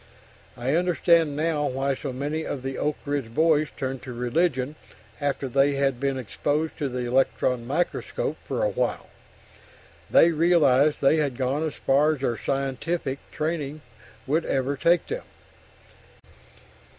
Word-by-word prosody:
I 125 +3 -1
understand 170 -3 +3
now 150 -1 0
why 135 +2 0
so 135 +1 -5
many 145 +5 -3
of 135 -4 -5
the 135 0 -3
Oak 150 0 0
Ridge 140 -6 -3
boys 155 -1 +3
turned 130 -2 -3
to 130 -1 -7
religion 130 +2 0 0.5
after 140 -1 -1
they 140 +2 +2
had 135 -3 +1
been 135 0 0
exposed 145 +6 -2
to 145 - -1
the 125 -1 -3
electron 125 -1 +1
microscope 175 - -2
for - - -1
a - - +2
while - - -2 1.0
they 170 - +6
realized 155 -4 +3
they 140 +3 +4
had 140 -5 0
gone 135 +3 0
as 160 -2 -2
far 150 +3 +3
as 135 - -13
their 120 -3 0
"scientific" 135 +3 -2
training 155 -2 -3 0.4
would 155 +5 +1
ever 135 +1 0
take 170 +5 +3
them. 480 +3 -4
140 Hz, 145 wpm, -25 LUFS, 130-160 Hz, 1.0 s, they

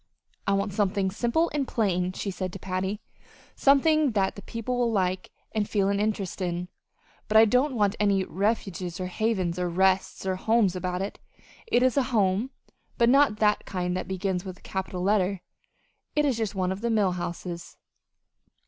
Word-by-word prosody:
"I 200 - +3
want 200 0 0
something 195 -1 +1
simple 240 - +1
and 285 -3 -1
plain," 185 -5 0
she 195 - -3
had - - -9
said 185 -1 -4
to - - -5
Patty; 190 +3 -3 0.5
"something 285 0 +4
that 195 -2 +1
the 200 - -8
people 230 +4 -4
will 240 -1 +2
like, 185 -3 0 0.2
and 215 -2 -1
feel 200 -2 +1
an 200 0 +1
interest 205 -3 -2
in. 175 0 -2 0.6
But 215 - +4
I 220 - +9
don't 250 +5 +2
want 205 -2 +2
any 200 -2 +2
'Refuges' 190 -4 -2
or 185 - -2
'Havens' 185 -3 -1
or 180 -1 0
'Rests' 190 +2 +1
or 190 -1 0
'Homes' 220 -2 +2
about 180 0 -2
it. 200 - -6 0.5
It 245 - +3
is 255 +1 +2
a 275 - +4
home, 200 +5 +2 0.5
but 235 0 +4
not 275 -4 +4
the 210 -1 +4
kind 180 -1 -2
that 185 - -3
begins 190 -1 -2
with 185 -2 -7
a - - -23
capital 190 -1 -4
letter. 195 -1 +1 0.7
It 300 0 +3
is 270 -4 +2
just 220 -3 -2
one 185 -1 0
of 190 +2 -4
the 235 - 0
mill 210 -4 +2
houses." 175 -1 -6
195 Hz, 185 wpm, -27 LUFS, 185-225 Hz, 0.7 s, I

